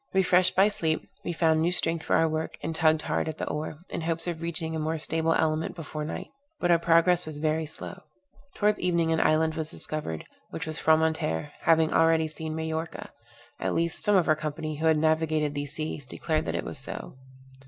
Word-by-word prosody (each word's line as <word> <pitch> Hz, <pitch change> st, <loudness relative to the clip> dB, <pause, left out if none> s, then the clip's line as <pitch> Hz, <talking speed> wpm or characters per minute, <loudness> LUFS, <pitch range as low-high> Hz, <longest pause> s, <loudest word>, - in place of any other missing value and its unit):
Refreshed 185 Hz, -1 st, +4 dB
by 195 Hz, +2 st, +6 dB
sleep, 160 Hz, -6 st, -1 dB, 0.2 s
we -, -, -2 dB
found 160 Hz, -2 st, +2 dB
new 170 Hz, +2 st, +2 dB
strength 165 Hz, -2 st, 0 dB
for -, -, +1 dB
our 165 Hz, -, +4 dB
work, 155 Hz, 0 st, -3 dB
and 160 Hz, -, -2 dB
tugged 160 Hz, -1 st, +3 dB
hard -, -, -1 dB
at 155 Hz, -, -5 dB
the -, -, -3 dB
oar, 150 Hz, 0 st, -3 dB
in 170 Hz, -, -4 dB
hopes 165 Hz, 0 st, -1 dB
of 170 Hz, -2 st, -3 dB
reaching 160 Hz, -1 st, -1 dB
a -, -, -2 dB
more 160 Hz, +1 st, -1 dB
stable 160 Hz, +1 st, 0 dB
element 160 Hz, +1 st, 0 dB
before 155 Hz, -2 st, -5 dB
night. 150 Hz, -, -5 dB, 0.3 s
But 175 Hz, -, +2 dB
our 170 Hz, -, +5 dB
progress 170 Hz, +1 st, +4 dB
was 155 Hz, -2 st, -5 dB
very 155 Hz, +1 st, 0 dB
slow. 155 Hz, -, -8 dB, 0.5 s
Towards 210 Hz, 0 st, +2 dB
evening 170 Hz, -2 st, +1 dB
an 160 Hz, -, +2 dB
island 160 Hz, +1 st, +3 dB
was 160 Hz, -1 st, -4 dB
discovered, 150 Hz, -, -5 dB, 0.2 s
which 180 Hz, -, -5 dB
was 155 Hz, -1 st, -3 dB
Fromentere, 160 Hz, -, +1 dB
having 160 Hz, -1 st, +4 dB
already 165 Hz, -1 st, +4 dB
seen 155 Hz, 0 st, -5 dB
Majorca; 160 Hz, 0 st, -4 dB, 0.5 s
at -, -, -1 dB
least, 170 Hz, 0 st, -1 dB
some 210 Hz, -, +3 dB
of 180 Hz, -3 st, +4 dB
our 155 Hz, -, +5 dB
company, 155 Hz, 0 st, -4 dB
who 160 Hz, +2 st, +1 dB
had 160 Hz, -1 st, +4 dB
navigated 155 Hz, -1 st, +1 dB
these 145 Hz, 0 st, -3 dB
seas, 155 Hz, -3 st, -4 dB
declared 155 Hz, +3 st, -1 dB
that 85 Hz, -1 st, -2 dB
it 85 Hz, -, -2 dB
was -, -, -5 dB
so. -, -, -6 dB
160 Hz, 205 wpm, -27 LUFS, 155-165 Hz, 0.5 s, by